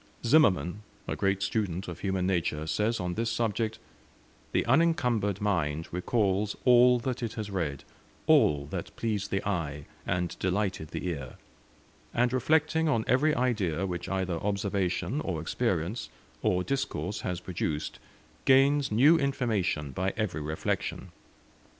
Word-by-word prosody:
Zimmerman, 105 - +4 0.3
a - - -2
great 95 0 0
student 95 -3 -1
of - - -6
human 95 -2 -1
nature, 85 -4 0
says 105 +8 0
on 90 -1 -2
this 115 +4 -1
subject 110 -1 -1 0.7
"The - - +1
unencumbered 125 - +2
mind 80 -6 0
recalls 100 +2 0
all 125 0 +7
that 125 +1 -3
it 115 -2 -3
has 110 -3 -5
read, 80 -8 -2 0.4
all 70 -2 +4
that - - -5
pleased 105 -3 -2
the 100 0 -2
eye, 75 -7 -2 0.2
and 90 -1 -1
delighted 95 -3 -1
the - - -5
ear; 70 -7 -4 0.8
and 120 +1 +2
reflecting 160 +4 +2
on 115 -6 +1
every 150 +5 +3
idea 100 -9 0
which 90 -2 -4
either 95 -3 -1
observation, 100 - -1
or 90 -4 -2
experience, 95 +3 -1 0.3
or 90 0 +1
discourse 110 -5 -2
has 90 -2 -3
produced, 80 -4 -3 0.5
gains 135 +1 +4
new 145 +10 +6
information 110 - 0
by 95 +8 -2
every 105 -8 -1
reflection. 75 +1 -3
100 Hz, 135 wpm, -29 LUFS, 90-120 Hz, 0.8 s, all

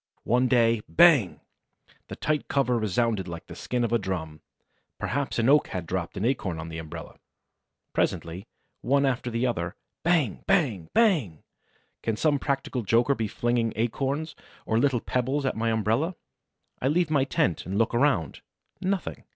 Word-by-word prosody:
One 125 +2 +2
day, 115 -3 +3
bang! 160 - +5 0.7
The - - -7
tight 150 -1 -1
cover 125 -4 +1
resounded 110 -1 0
like 85 -1 -7
the - - -10
skin 125 -1 -2
of 120 0 -1
a 120 - +3
drum. 80 -6 -4 0.6
Perhaps 140 -1 -2
an 115 0 +2
oak 150 +2 +5
had 90 -2 -4
dropped 90 +2 -3
an 100 - -1
acorn 105 -9 -1
on 80 +1 -6
the 80 0 -6
umbrella. 80 -1 -9 0.7
Presently, 85 +4 -2 0.3
one 140 +3 +2
after 125 -2 -1
the 115 +1 -1
other, 85 -8 -2 0.3
bang, 160 - +1
bang, 130 - +1
bang! 155 - +2 0.6
Can 115 -2 -1
some 145 0 +2
practical 135 -2 -2
joker 115 +5 +3
be 115 -5 -2
flinging 120 +1 0
acorns 135 +7 -2 0.3
or 110 - +1
little 125 -2 +2
pebbles 130 +3 -1
at 130 - 0
my 115 +1 0
umbrella? 115 - 0 0.7
I 130 - +1
leave 160 +2 +1
my 140 -3 +3
tent 90 - 0
and 95 +2 -2
look 115 +1 +2
around: 120 - +1 0.4
nothing! 190 -1 -2
120 Hz, 160 wpm, -26 LUFS, 100-140 Hz, 0.7 s, bang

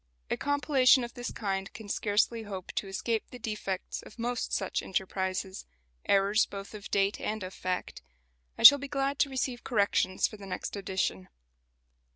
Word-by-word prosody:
A - - +3
compilation 280 -3 +4
of 235 - -6
this 245 0 -5
kind 195 -1 -3
can 220 - -10
scarcely 210 +3 +1
hope 195 -4 -7
to 200 - -3
escape 220 +3 -2
the 250 - -9
defects 210 -4 -4
of - - -14
most 240 +1 -2
such 190 - -1
enterprises 190 0 -3 0.4
errors 200 +2 +4
both 200 +1 -8
of 210 -2 -8
date 200 0 +1
and 215 -2 -3
of 185 +1 -6
fact. 185 0 -4 0.6
I - - -4
shall 285 +5 +12
be 280 - -5
glad 275 0 -1
to 285 - +3
receive 260 -2 -2
corrections 200 -4 +2
for 215 - -11
the 200 -1 -10
next 185 - -4
edition. 185 - -2
210 Hz, 170 wpm, -30 LUFS, 195-245 Hz, 0.6 s, shall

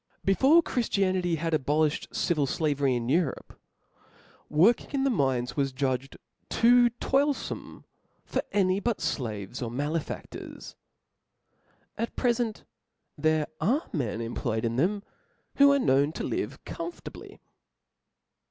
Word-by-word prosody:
Before 270 - +5
Chrifti 230 -8 0
anity 180 -3 +1
had 165 +1 -2
abolifhed 150 +1 +1
civil 150 -5 +1
flavery 140 -3 +1
in 120 -1 -2
Europe, 160 +3 -1 0.9
work 185 +11 +4
ing - - -18
in 275 -1 +1
the 275 - +2
mines 130 - 0
was 140 -2 0
judged 130 0 -2 0.3
too 240 +1 +5
toilfome 280 +1 -1 0.4
for - - -1
aiiy 190 -1 +2
but 235 -3 +1 0.2
{laves 110 -1 -5
or 120 - -2
malefadlors: 145 +6 -5 1.3
at 230 - -3
prefent 235 -3 0 0.5
there 155 0 +1
are 275 - +1
m^n 115 - -2
employed 115 -1 -2
in 115 0 -1
them, 195 - +1 0.5
who 280 0 +7
are 280 - +4
known 140 - +3
to - - -4
live - - -3
♦ - - -46
com 340 0 -5
fortably. - - -11
160 Hz, 130 wpm, -28 LUFS, -, 1.3 s, who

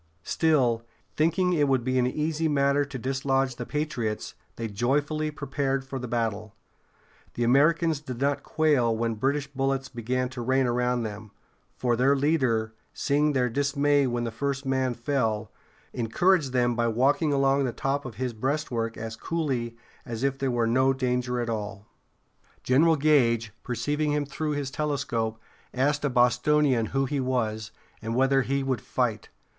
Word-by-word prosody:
Still, 130 - +2 0.3
thinking 170 +4 +2
it 150 -4 +2
would 130 -3 +2
be 130 +1 +1
an 125 - +2
easy 155 +4 -1
matter 140 -1 +2
to 140 -2 -6
dislodge 135 0 0
the 120 - -5
patriots, 125 -8 -3 0.2
they 115 - -4
joyfully 145 +8 0
prepared 135 -2 -2
for 135 0 -5
the 125 - -5
battle. 110 -3 -2 0.8
The 120 - -1
Americans 155 +5 +3
did 130 -5 -7
not 140 +1 +1
quail 140 -9 +2
when 115 0 0
British 135 +6 0
bullets 135 -1 -2
began 125 +2 -2
to 130 -1 -6
rain 130 +2 +2
around 125 0 0
them, 105 0 -6 0.5
for 120 -2 +1
their 135 +4 +3
leader, 130 -7 +1 0.2
seeing 150 +1 +1
their 125 -2 +2
dismay 140 +2 +2
when 120 -1 -1
the 115 - -3
first 140 +4 -3
man 130 -2 0
fell, 115 -4 -1 0.4
encouraged 145 +6 +2
them 120 -1 +2
by 120 0 +1
walking 135 +7 +2
along 135 0 +2
the 125 - -1
top 135 +4 -2
of 120 -5 -8
his 125 +2 -3
breastwork 120 -2 -2
as 115 0 -5
coolly 125 -5 -2 0.3
as 115 0 -5
if 135 0 0
there 135 - 0
were 120 -2 +1
no 130 +3 +3
danger 125 -1 -1
at 120 - -2
all. 105 -3 -4 0.8
General 160 +6 +4
Gage, 120 -7 +2
perceiving 145 +4 -1
him 145 -1 0
through 150 +2 -3
his 145 -2 -3
telescope, 125 -7 -2 0.4
asked 145 +3 +1
a 145 - +2
Bostonian 125 0 +3
who 135 0 0
he 140 +1 -2
was, 110 -4 -1 0.3
and 115 +1 -3
whether 135 +1 +3
he 135 +2 -1
would 130 -4 -1
fight. - - -2
130 Hz, 160 wpm, -26 LUFS, 120-145 Hz, 0.8 s, General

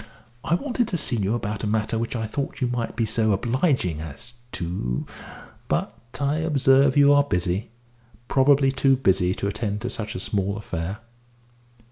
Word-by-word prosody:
I 170 - +2
wanted 245 +1 -1
to 180 - -1
see 140 -5 +1
you 105 +2 0
about 105 -3 -4
a - - 0
matter 110 +1 0
which 115 +2 -3
I 110 -1 -2
thought 140 +6 -4
you 130 - +1
might 120 -1 -3
be 115 - +1
so 110 -1 +1
obliging 120 - 0
as 80 - -8 0.2
to 85 -9 -2 0.6
But - - -1 0.2
I 145 +1 +1
observe 140 -3 +3
you 145 0 +7
are 145 0 +5
busy 90 -4 -1 0.6
probably 135 0 +4
too 135 0 +3
busy 95 -7 +2
to 100 - -2
attend 105 0 -3
to 120 - -3
such 110 -1 -4
a - - -3
small 100 +1 -1
affair." 95 +1 -5
115 Hz, 170 wpm, -24 LUFS, 100-135 Hz, 0.6 s, you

